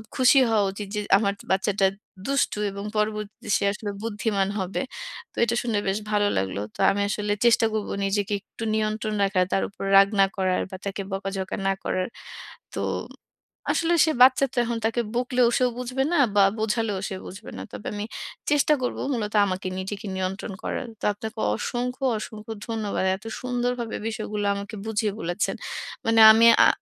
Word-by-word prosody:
খুশি 260 +1 +6
হওয়া 215 -2 +3
উচিৎ, 200 0 -6
যে - - 0 0.2
আমার 200 -1 +1
যে - - -13
বাচ্চাটা 195 0 +2 0.4
দুষ্টু 275 -6 +1
এবং 200 +1 -6
পরবর্তীতে 210 0 -2
সে - - -3
আসলে 210 -1 -5
বুদ্ধিমান 210 -3 0
হবে। 185 0 -2 0.5
তো - - -30
এটা 235 0 +1
শুনে 230 -4 0
বেশ 195 +2 +1
ভালো 205 -1 +3
লাগলো। 95 +1 -1
তো - - -16
আমি 200 - -1
আসলে 210 0 -1
চেষ্টা 230 -1 +5
করব 215 -1 -2 0.2
নিজেকে 205 +1 0
একটু 225 - -10
নিয়ন্ত্রণ 215 0 -1
রাখার, 190 -2 +2
তার - - +2
উপর 200 - -9
রাগ 195 0 +8
না 195 - +8
করার, 185 -1 +1
বা - - -5
তাকে 200 0 -3
বকাঝকা 195 -1 -3
না 195 - +3
করার। 185 0 -1 0.7
তো - - -2 0.9
আসলে 335 +1 +1
সে 315 - +2
বাচ্চাতো 260 0 +5
এখন 235 0 -2
তাকে 230 +2 0
বকলেও 250 0 +2
সেও 250 -1 +2
বুঝবে 250 +1 -1
না, - - +3 0.2
বা 200 - +7 0.2
বোঝালেও 220 -2 0
সে 190 - -5
বুঝবে 190 - -9
না। - - -5
তবে 105 0 -8
আমি 205 - -3 0.5
চেষ্টা 295 +1 +4
করব 250 - -2
মূলত 210 -4 -2
আমাকে 185 0 -3
নিজেকে 200 +3 -5
নিয়ন্ত্রণ 190 +1 -3
করার। 255 - -3
তো - - -7
আপনাকে 220 +2 -7 0.2
অসংখ্য, 250 - -3 0.2
অসংখ্য 215 0 -7 0.2
ধন্যবাদ। 215 -4 -2
এত 200 - -18 0.2
সুন্দরভাবে 245 -2 -2
বিষয়গুলো 215 -2 -3
আমাকে 200 +2 -6
বুঝিয়ে 215 -1 0
বলেছেন। 175 +4 -1 0.5
মানে 225 0 +4
আমি 230 +1 +5
অ্যা - - +7
210 Hz, 170 wpm, -25 LUFS, 195-235 Hz, 0.9 s, রাগ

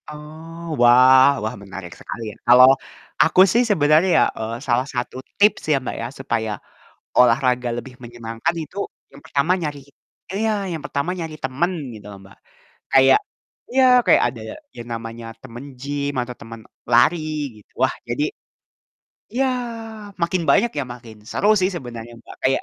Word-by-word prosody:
Oh, 160 +2 -9
wah 130 +2 +7
wah, 110 +3 -3
menarik 95 -3 -9
sekali 115 - -7
ya. - - -17
Kalau, 125 +1 +8 0.5
aku 185 - +5
sih 240 +4 +4
sebenarnya 155 0 +4
ya, - - +6 0.2
eee, 110 +1 -3
salah 125 +2 +1
1 125 0 -3 0.2
tips 210 +1 +4
ya, 145 - +4
Mbak, - - -4
ya, 115 - -3
supaya 110 -4 -2 0.7
olahraga 125 0 +3
lebih 125 +2 -9
menyenangkan. 120 +5 -4
Itu, 155 - -12 0.4
yang 140 +1 -15
pertama 140 +5 +1
nyari 150 -3 -4 0.5
iya, 220 +3 0 0.2
yang 160 - -4
pertama 140 +5 -2
nyari 160 -2 -5
teman 145 +8 0 0.2
gitu 105 -2 -12
loh, 100 - -11
Mbak, 95 - -17 0.6
kayak 135 - +6 0.5
iya, 265 +1 +3 0.2
kayak - - +5
ada 115 - -7 0.3
yang 120 - -9
namanya 115 0 -7 0.2
temen 120 0 -9 0.2
gym 145 +1 -3
atau 125 0 -6
temen 115 0 -10 0.3
lari, 160 +8 +5 0.4
gitu. 105 - -21
Wah - - +3 0.2
jadi - - -1 1.1
iya, 265 +3 +1 0.8
makin 170 +1 0
banyak, 235 - +4
ya 140 - -1
makin 115 -3 -13
seru 205 - 0
sih 185 +1 +2
sebenarnya, 120 -5 -8
Mbak, - - -13
kayak 135 - +2
130 Hz, 155 wpm, -21 LUFS, 120-160 Hz, 1.1 s, Kalau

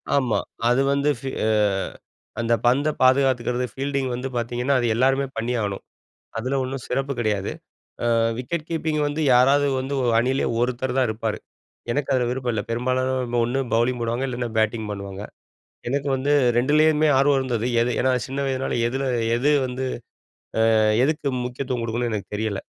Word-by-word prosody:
ஆமா, 130 -5 +2 0.3
அது 125 +2 +3
வந்து 140 +1 +1
ஃபீ 135 - -5 0.2
அ - - +2 0.9
அந்த 115 0 +1
பந்த 135 +5 +3
பாதுகாத்துக்கிறது. 130 -2 +3
ஃபீல்டிங் 140 -1 -2
வந்து 125 +2 -3
பார்த்தீங்கன்னா, 120 +3 -1
அது 120 - 0
எல்லோருமே 135 +3 +2
பண்ணியாகணும். 115 -4 -2 0.5
அதில 130 +4 -1
ஒண்ணும் 130 0 -5
சிறப்பு 135 +2 -1
கிடையாது. 105 -4 -1 0.6
அ - - +3 0.2
விக்கெட் 155 +5 -4
கீப்பிங் 160 -2 -1
வந்து, 145 +2 -2
யாராவது 135 +3 +5
வந்து 135 +2 -3 0.2
அணியிலேயே 130 +3 +1
ஒருத்தர் 125 +1 -1
தான் 130 - +3
இருப்பாரு. 110 0 -2 0.5
எனக்கு 145 +1 -2
அதில 125 -2 +1
விருப்பம் 125 -1 -2
இல்ல. 105 - -1
பெரும்பாலானவங்க 125 0 0
ஒண்ணு 125 +3 -1 0.2
பௌலிங் 120 +2 +1
போடுவாங்க. 120 +3 -1
இல்லன்னா 120 -1 -3
பேட்டிங் 110 0 0
பண்ணுவாங்க. 100 0 -7 0.7
எனக்கு 140 +2 -1
வந்து 135 +2 -1 0.3
2லேயுமே 155 +4 +4
ஆர்வம் 140 +1 +4
இருந்தது. 120 -3 -2 0.2
எது 120 +1 +1
ஏன்னா, 130 0 +2 0.2
சின்ன 135 +1 -4
வயதினால 135 -1 -1
எதில 135 +3 -2 0.3
எது 140 +5 +2 0.2
வந்து 130 +1 -4 0.9
அ - - +5 0.3
எதுக்கு 150 -1 0 0.2
முக்கியத்துவம் 125 -1 -3
குடுக்கணும்னு 115 +1 -2
எனக்கு 105 -1 -5
தெரியல. 110 -2 -2
130 Hz, 150 wpm, -23 LUFS, 120-135 Hz, 0.9 s, யாராவது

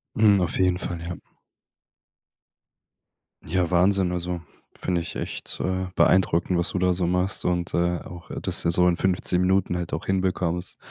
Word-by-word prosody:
Mhm, 105 -3 +5
auf 90 - -1
jeden 90 -1 +3
Fall, 85 -2 -5
ja. 85 +1 -5 2.3
Ja, 90 +1 -1
Wahnsinn, 90 +1 +3
also 90 -1 -3 0.4
finde 90 -2 0
ich - - -7
echt, - - -4
äh, 95 0 -1
beeindruckend, 90 -1 +3
was 85 - 0
du 95 - -2
da 90 0 +3
so 90 -1 0
machst 90 +2 0
und, 90 -1 -1
äh, 85 0 +1
auch, 85 -1 -11
äh, - - -4
dass - - +1
du - - 0
das 85 - +1
so 90 0 +4
in 85 - +2
15 90 -1 +1
Minuten 95 -1 +2
halt 85 -1 -5
auch 80 - -3
hinbekommst. 90 -2 -1
90 Hz, 175 wpm, -25 LUFS, 85-95 Hz, 2.3 s, Mhm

